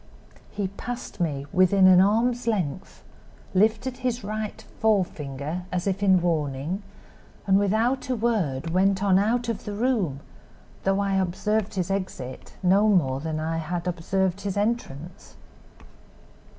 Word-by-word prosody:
"He 200 -2 -2
passed 245 +5 -7
me, 145 -5 -1
within 185 +1 +5
an 185 -1 +8
arm's 235 +4 +2
length, 185 -8 -2 0.5
lifted 220 +6 +2
his 250 -1 -2
right 215 +1 -4 0.2
forefinger, 170 -6 -1
as 180 -1 -2
in 195 -1 +3
warning, 155 +2 -1 0.6
and 195 0 +4
without 225 +7 +1
a 255 - +1
word 175 - -1
went 190 +2 +2
on 190 -2 +4
out 235 +4 +1
of 230 -3 -3
the 205 - -4
room, 205 - 0 0.6
though 195 +1 +2
I 195 -1 +1
observed 210 +3 -1
his 185 -1 -1
exit 185 -10 -5
no 195 +4 +4
more 135 -10 +2
than 155 +1 -3
I 160 +1 -2
had 170 +2 -3
observed 185 +2 -1
his 200 0 -3
entrance. 190 - -3
195 Hz, 135 wpm, -25 LUFS, 170-215 Hz, 0.6 s, an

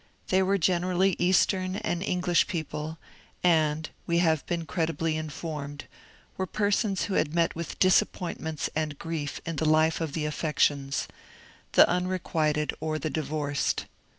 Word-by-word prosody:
They 190 0 +4
were 195 +1 +2
generaUy 180 +1 +2
Eastern 185 +1 +2
and 175 -3 -2
English 180 -2 +2
people, 160 -3 -4 0.5
and, 155 -3 +3 0.2
we 170 - +2
have 160 -4 +3
been 170 -1 -2
credibly 160 -1 -1
informed, 150 -2 -5 0.5
were 190 - -1
persons 205 0 +1
who 200 - -2
had 155 -3 +1
met 170 -1 +2
with 170 0 -5
disappointments 175 -4 +1
and 155 -2 -1
grief 155 -4 -4
in 165 -2 -4
the 155 0 +1
life 155 +1 +3
of 160 -3 -2
the 155 -1 -1
affections 145 -2 0 0.3
— - - -25
the - - +8
unrequited 170 -4 0
or 155 0 -2
the 155 0 -3
divorced. 150 -2 -1
165 Hz, 145 wpm, -28 LUFS, 155-180 Hz, 0.5 s, the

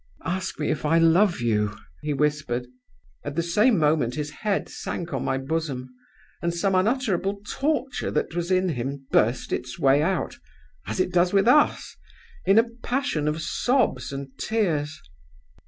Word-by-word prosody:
'Ask 180 +1 -3
me 150 - 0
if 155 - -3
I 160 +2 +3
love 170 +1 +4
you,' 105 -3 0 0.2
he 150 - -2
whispered. 145 -4 0 0.6
At 145 0 -5
the 170 - +1
same 210 +7 +3
moment 150 -6 +2
his 150 0 -3
head 200 +5 -2
sank 170 -2 -5
on 135 - -1
my 135 - 0
bosom; 135 -3 -3 0.5
and 170 - 0
some 190 +3 0
unutterable 200 -1 +1
torture 285 -2 -1
that 150 - -1
was 175 0 -2
in 185 0 +2
him 135 -1 -4
burst 120 +4 +2
its 125 0 -4
way 135 +1 +4
out, 185 +4 -1 0.5
as - - -3
it 185 0 0
does 175 +1 +3
with 195 +2 +4
us, 295 +4 +3 0.5
in 195 +2 +5
a 230 +1 +5
passion 245 - -1
of 155 +2 -1
sobs 250 - 0
and 135 -1 -7
tears. 155 -9 -1
165 Hz, 160 wpm, -25 LUFS, 140-195 Hz, 0.6 s, in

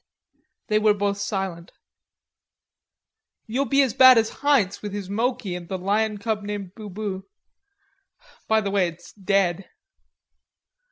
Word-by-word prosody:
They 215 0 +1
were 215 -1 +3
both 200 0 -1
silent. 190 -4 -4 1.7
"You'll 250 +5 -1
be 275 0 +4
as 255 -5 -1
bad 260 -1 +8
as 225 0 +2
Heinz 270 -10 +2
with 205 -1 -6
his 200 -2 -5
Moki 225 -3 -1
and 175 -1 -7
the 190 - -2
lion 210 +3 0
cub 215 0 -2
named 205 -3 -6
Bubu.... 205 -2 -6 1.2
By 220 0 +3
the 200 -1 -3
way, 195 -3 +2
it's 170 0 -11
dead.... 195 -2 0
205 Hz, 130 wpm, -24 LUFS, 190-220 Hz, 1.7 s, bad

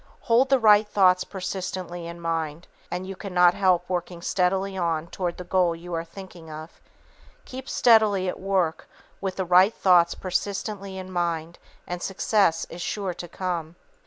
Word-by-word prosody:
Hold 245 +3 +3
the 270 - +5
right 215 -3 +5
thoughts 185 -3 +4
persistently 185 -2 -5
in 170 0 -8
mind, 165 -1 -3 0.2
and 180 +1 -4
you 195 0 -6
cannot 180 -3 +3
help 180 -2 +2
working 175 -1 -4
steadily 190 +1 0
on 165 -3 -1
toward 175 0 -4
the 180 - -6
goal 180 -1 +1
you 175 +1 -9
are 165 0 -1
thinking 170 -1 -12
of. 155 +1 -10 0.6
Keep 260 +1 -8
steadily 215 -5 +4
at 180 - -3
work 185 -4 -1 0.3
with 190 -1 -3
the 190 - -2
right 180 +4 +5
thoughts 175 -3 +4
persistently 195 +1 -3
in 185 0 -7
mind 170 -2 -2 0.3
and 175 0 -5
success 195 -3 +1
is 175 - -7
sure 195 0 -3
to 175 0 -8
come. 175 -2 -4
180 Hz, 160 wpm, -25 LUFS, 170-195 Hz, 0.6 s, the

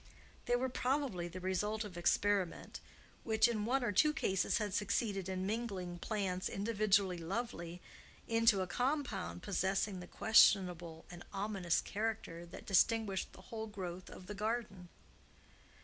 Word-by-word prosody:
They 245 - +3
were 255 +2 +1
probably 255 -8 -1
the 175 +2 -7
result 210 +4 -1
of 205 -4 -8
experiment, 190 +1 0 0.4
which 220 0 +4
in 215 -3 -1
one 260 +3 +1
or 235 - +1
two 300 +10 +4
cases 195 -11 +1
had 210 -4 -2
succeeded 200 -1 0
in 185 0 -2
mingling 195 -5 -3
plants 190 -3 -2
individually 200 -3 +1
lovely 175 -2 -4 0.5
into 230 -3 +4
a - - 0
compound 245 -4 -2
possessing 195 0 0
the 180 - -8
questionable 180 -7 +4
and 175 0 -9
ominous 195 -4 0
character 205 -5 -3
that 170 - -10
distinguished 205 -1 +2
the - - -13
whole 220 0 -3
growth 185 -3 -6
of 185 - -11
the 210 - -6
garden. 210 -4 -3
200 Hz, 140 wpm, -35 LUFS, 180-225 Hz, 0.5 s, which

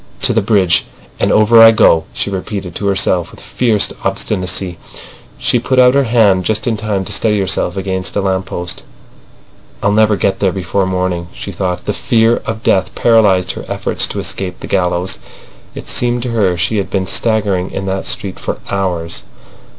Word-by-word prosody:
"To - - +5
the 110 - +2
bridge—and 100 -4 0
over 110 +2 +6
I 115 - +10
go," 105 -7 +4
she 100 - -3
repeated 95 -1 -5
to 100 - -3
herself 95 -3 +1
with - - -15
fierce 110 -5 0
obstinacy. 90 -1 -2 0.6
She 120 - +1
put 130 +2 -1
out 125 0 +6
her 140 0 +3
hand 110 -6 +3
just 110 +2 -1
in 120 - 0
time 105 -3 -2
to - - -5
steady 105 -2 +1
herself 95 -1 -1
against 95 -1 -3
a 100 - +1
lamp 95 -1 -1
post. 90 -1 -5 1.0
"I'll 100 - +3
never 110 0 +3
get 95 0 -1
there 95 -2 +2
before 95 +1 -1
morning," 90 -2 -2
she 100 - -6
thought. 90 -1 -3
The - - -1
fear 115 0 +2
of 110 0 -4
death 95 -1 +1
paralysed 100 -6 +3
her - - -8
efforts - - -1
to - - -5
escape 95 -2 -4
the - - -6
gallows. 90 0 0 0.6
It - - -8
seemed 120 -1 0
to 125 - -3
her 100 -6 +1
she 105 +5 0
had 100 - -2
been 95 -2 -1
staggering 100 -3 0
in 95 - -5
that 95 0 -3
street 95 -2 -3
for - - -4
hours. 90 -4 -2
100 Hz, 180 wpm, -15 LUFS, 95-110 Hz, 1.0 s, I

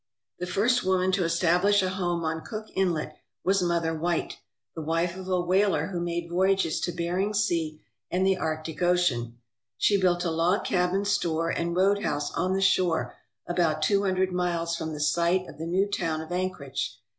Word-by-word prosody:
The 180 - -3
first 240 +7 +2
woman 185 0 +2
to 185 0 +1
establish 180 +4 +3
a 185 - 0
home 175 -2 -1
on 160 0 -2
Cook 215 -1 -7
Inlet 175 -5 -1 0.3
was 195 +1 +2
Mother 170 -2 0
White, 170 +2 -2 0.4
the 160 - -6
wife 165 +3 -1
of 190 0 -8
a 185 -1 +2
whaler 190 +4 +2
who 180 -3 -3
made 170 0 -2
voyages 190 -1 +1
to 175 - -2
Bering 180 +5 -1
Sea 165 -7 0 0.3
and 185 +2 +1
the 190 0 +4
Arctic 155 -2 -4
Ocean. 145 -10 +1 0.4
She 200 - +3
built 175 -1 +2
a 170 - 0
log 170 +4 +1
cabin 185 +2 +1
store 165 -4 0
and 170 0 -2
roadhouse 185 -6 +1
on 185 +1 0
the 195 - 0
shore 180 -3 +2 0.3
about 170 -3 0
two 200 +5 +3
hundred 190 -1 +1
miles 170 -2 -1
from 160 -1 -4
the 150 - -6
site 170 +4 +1
of 145 - -12
the 165 - -4
new 190 +4 +1
town 165 -6 -2
of 160 +2 -9
Anchorage. 165 - -3
175 Hz, 180 wpm, -27 LUFS, 165-190 Hz, 0.4 s, the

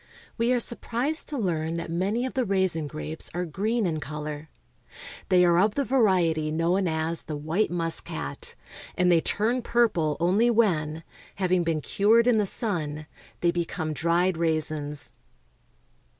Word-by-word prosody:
We 235 +1 +1
are 250 - +3
sur 235 - +1
prised 275 +7 -2
to 295 - -4
learn 165 -6 -1
that 165 -1 -5
many 200 +8 0
of 260 - -4
the 260 - 0
raisin 190 -7 +1
grapes 155 +1 -3
are 180 0 -1
green 215 +7 -1
in 160 -3 -1
color. 150 +1 -6 0.8
They 180 -1 +5
are 170 0 +4
of 205 +3 +2
the 280 - +1
variety 180 -12 +2
known 175 +4 +1
as 160 +1 -1
the 155 - -6
white 160 +8 0
muscat, 175 - -3 0.4
and 180 -1 +3
they 165 -1 +4
turn 230 +8 0
purple 190 -12 +1
only 195 +8 +3
Avhen, 165 -9 +1 0.3
having 185 -1 +1
been 165 -2 -1
cured 220 +8 +3
in 240 -3 +4
the 205 - +1
sun, 155 - -3 0.4
they 175 - +3
be 175 0 -1
come 160 -2 -4
dried 170 +4 +1
raisins. 155 -3 0
175 Hz, 160 wpm, -26 LUFS, 160-215 Hz, 0.8 s, They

